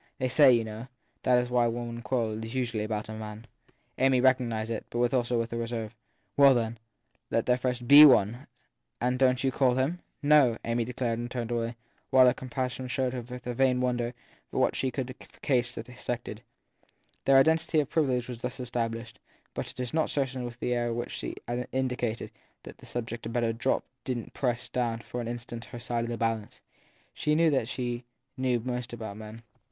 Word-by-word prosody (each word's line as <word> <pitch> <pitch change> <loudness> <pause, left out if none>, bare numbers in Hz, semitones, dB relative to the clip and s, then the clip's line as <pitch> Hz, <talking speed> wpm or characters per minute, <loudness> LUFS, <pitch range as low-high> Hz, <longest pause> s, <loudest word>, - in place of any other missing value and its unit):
t - - -33
They 130 -1 0
say, 140 0 +7
you 120 -2 +3
know, 110 +2 -7 0.3
that 125 -1 +3
when 120 -2 +3
women 120 -1 -4
do - - -7
quarrel 110 -1 -1
it 110 - -5
s 115 +3 -7
usually 120 -4 -1
about 105 -1 -3
a - - -7
man. 110 +1 -7 0.5
7 130 - +3
Amy 130 -1 +4
recognised 120 -4 +2
it, 110 - -4
but 120 +1 0
also 120 -1 +1
with 115 0 -2
a - - -2
reserve. 115 -1 -4 0.4
Well, 140 -2 +7
then, 115 -1 -1 0.5
let - - +1
there 125 - +4
first 125 -1 -2
be 145 +3 +11
one! 120 -2 +5 0.5
And 125 +1 0
don 130 -1 +5
t 130 +1 -1
you - - +2
call 130 -2 +3
him? 140 +7 0 0.2
No! 145 -6 +5
Amy 115 0 0
declared 120 -1 -2
and 120 0 -4
turned 120 -2 -4
away, 115 0 -1 0.3
while 130 -1 +7
her 125 - +5
companion 130 0 -4
showed 130 0 -1
her 125 -2 -4 0.2
a 125 - -2
vain 130 0 +3
wonder 120 -1 -1 0.3
for - - -2
what - - +2
she 130 - 0
could 130 0 -4
in - - -10
that - - -17
case 125 -2 +1
have 115 - -6
expected. 120 -3 -5 0.8
Their 135 0 +6
identity 160 +3 +4
of 145 - +1
privilege 130 -6 +1
was 125 -2 -6
thus 125 +1 -5
established, 115 -1 -3 0.3
but - - -4
it - - -12
is 125 -2 -3
not 160 -1 +1
certain 135 -3 -1
that 120 0 -8
the 125 - 0
air 120 -1 0
with 115 - -3
which - - -13
she - - -4 0.4
indicated 125 -3 -2 0.3
that - - -11
the - - -14
subject 120 -1 -4
had 115 - -4
better 115 -1 +1
drop 120 +4 0 0.2
didn 125 -3 -2
t - - -14
press 120 -3 -1
down 120 -2 -1
for 125 - -5
an 115 - -5
instant 120 0 -6
her 120 - -9
side 120 0 -2
of - - -5
the 120 - -3
balance. 115 -2 -2 0.5
She 150 - +1
knew 165 0 +4
that 130 -5 +1
she 120 -1 -3 0.3
knew 130 -2 +1
most 125 0 -4
about 110 -3 -6
men. 110 +1 -9
120 Hz, 215 wpm, -29 LUFS, 115-130 Hz, 0.8 s, be